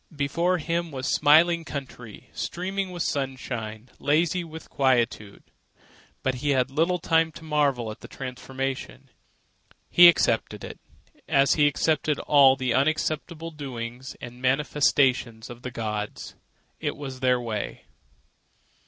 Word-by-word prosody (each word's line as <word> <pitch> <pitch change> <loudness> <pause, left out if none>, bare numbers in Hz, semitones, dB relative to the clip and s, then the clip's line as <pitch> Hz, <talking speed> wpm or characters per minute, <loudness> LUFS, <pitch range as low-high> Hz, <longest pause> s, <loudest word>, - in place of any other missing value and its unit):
Before 170 +6 +1
him 170 +1 -2
was 130 -3 -2
smiling 165 +3 +5
country, 130 -8 -8
streaming 190 +2 -3
with 175 -2 -3
sunshine, 125 -5 -4
lazy 165 +4 +1
with 160 -1 -10
quietude. 120 -6 0 0.8
But 130 - +1
he 145 - -1
had 130 +1 +1
little 165 +5 +1
time 165 -1 +2
to 165 - -11
marvel 140 -7 0
at 110 - -10
the - - -11
transformation. 135 0 -6 0.8
He 175 0 +9
accepted 170 - +2
it - - -8 0.5
as 140 -2 +4
he 145 -2 +4
accepted 150 0 +1
all 140 -3 +5
the 130 -3 -1
unaccountable 155 +3 -1
doings 130 -3 -7
and 125 0 -10
manifestations 130 -4 +1
of 120 0 -11
the 125 - -5
gods. 105 -3 -5 0.5
It - - -3
was 135 -3 -7
their 125 -1 +2
way. 110 -4 -5
140 Hz, 125 wpm, -25 LUFS, 125-160 Hz, 0.8 s, He